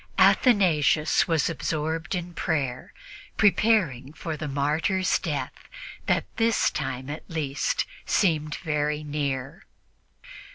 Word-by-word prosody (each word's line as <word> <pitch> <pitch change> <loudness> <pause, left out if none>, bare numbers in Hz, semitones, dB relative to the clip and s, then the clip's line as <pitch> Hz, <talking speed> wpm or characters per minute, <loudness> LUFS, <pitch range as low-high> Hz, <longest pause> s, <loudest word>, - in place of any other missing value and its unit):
Athanasius 170 - +4
was 165 -4 +2
absorbed 160 +2 -2
in 175 0 -5
prayer, 135 -7 -2 0.5
preparing 195 - +2
for 160 0 -5
the 155 0 -5
martyr's 150 +7 +1
death - - -5 0.4
that, - - +2
this 230 -1 +2
time 130 0 -4
at 150 +2 -5
least, 145 -4 -1 0.2
seemed 155 -6 +1
very 150 -1 -1
near. 145 +2 -3
155 Hz, 100 wpm, -26 LUFS, 145-175 Hz, 0.5 s, Athanasius